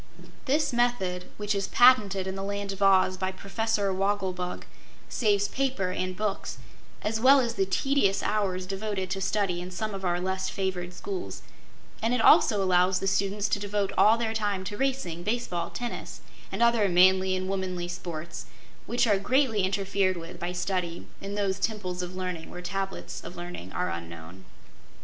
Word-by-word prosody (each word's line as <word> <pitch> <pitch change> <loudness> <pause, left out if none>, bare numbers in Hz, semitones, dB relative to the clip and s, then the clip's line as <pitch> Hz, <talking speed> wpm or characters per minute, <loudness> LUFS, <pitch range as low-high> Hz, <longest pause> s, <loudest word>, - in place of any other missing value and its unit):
This 285 0 +1
method, 235 -7 0
which 210 0 -1
is 200 -1 -1
patented 210 -7 +5
in 190 - -3
the 195 - -5
Land 200 0 -3
of 195 0 -7
Oz 190 -1 +4
by 185 0 -1
Professor 200 +1 -1
Wogglebug, 190 -2 -1 0.4
saves 205 -3 +2
paper 255 -9 -1
and 185 0 -3
books, 210 -2 -2 0.5
as 220 +1 0
well 270 +4 +7
as 235 -3 0
the 195 -4 0
tedious 200 -1 +1
hours 195 -3 0
devoted 195 -1 -3
to 195 0 -2
study 190 -3 0
in 180 - -6
some 215 +4 -4
of 195 -1 -6
our 175 -1 +1
less 190 +1 -2
favored 180 -2 -3
schools, 185 - -5 0.6
and 230 +2 +2
it - - 0
also 210 -2 +6
allows 180 0 +3
the - - -3
students 200 +1 +1
to - - +1
devote 205 -1 -1
all 220 +2 +6
their 225 -1 -1
time 205 -3 -1
to 205 - -5
racing, 255 -10 -1
base 235 +6 -1
ball, 175 -1 -3
tennis 240 -1 -6 0.3
and - - +1
other 235 -4 +4
manly 185 +1 +5
and 185 0 -3
womanly 185 -2 -2
sports, 170 -2 -6 0.4
which 240 - +2
are 205 -4 +3
greatly 250 0 +2
interfered 195 0 +1
with 165 +1 -8
by 175 +1 -3
study 180 -1 -2 0.2
in 200 +1 -5
those 200 -1 0
Temples 195 -4 -2
of 180 0 -6
Learning 180 -3 -4
where 180 - -8
Tablets 195 +2 -4
of 175 - -8
Learning 175 - -7
are - - -1
unknown. 85 +2 -8
195 Hz, 175 wpm, -27 LUFS, 180-210 Hz, 0.6 s, well